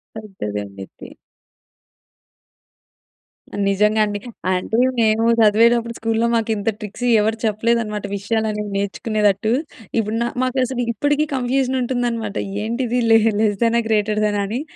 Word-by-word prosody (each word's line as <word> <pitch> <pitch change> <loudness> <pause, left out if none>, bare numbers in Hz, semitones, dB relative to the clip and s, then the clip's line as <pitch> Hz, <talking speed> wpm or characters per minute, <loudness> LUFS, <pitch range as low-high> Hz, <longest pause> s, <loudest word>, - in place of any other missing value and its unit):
పెద్దదండి 105 - -6
ఇది. - - -13 2.6
నిజంగా 210 +2 +2
అండి. 205 -1 -4 0.3
అంటే 185 +4 -1 0.2
మేము 220 0 +3
చదివేటప్పుడు 230 +2 +4
స్కూల్‌లో 225 +1 0
మాకు 225 -1 0
ఇంత 205 +1 -1
ట్రిక్స్ 210 +4 -6 0.2
ఎవరు 220 +1 0
చెప్పలేదన్నమాట. 215 -1 0
విషయాలు 220 +2 -1
అనేవి 210 -1 -4
నేర్చుకునేటట్టు, 205 +1 0 0.5
ఇప్పుడు 215 0 -2
న - - +1 0.2
మాకు 255 +1 -1
అసలు 245 -1 -3
ఇప్పటికి 290 +6 0
కన్ఫ్యూజన్ 260 +1 0
ఉంటుందన్నమాట. 235 -4 -2 0.3
ఏంటిది 240 +2 -1
లెస్ 225 0 +5
లెస్ 210 -2 +1
దెనా? 235 0 +3
గ్రేటర్ 215 0 +1
దెనా? 205 -1 -1
అని 240 +7 -3
220 Hz, 120 wpm, -20 LUFS, 210-235 Hz, 2.6 s, లెస్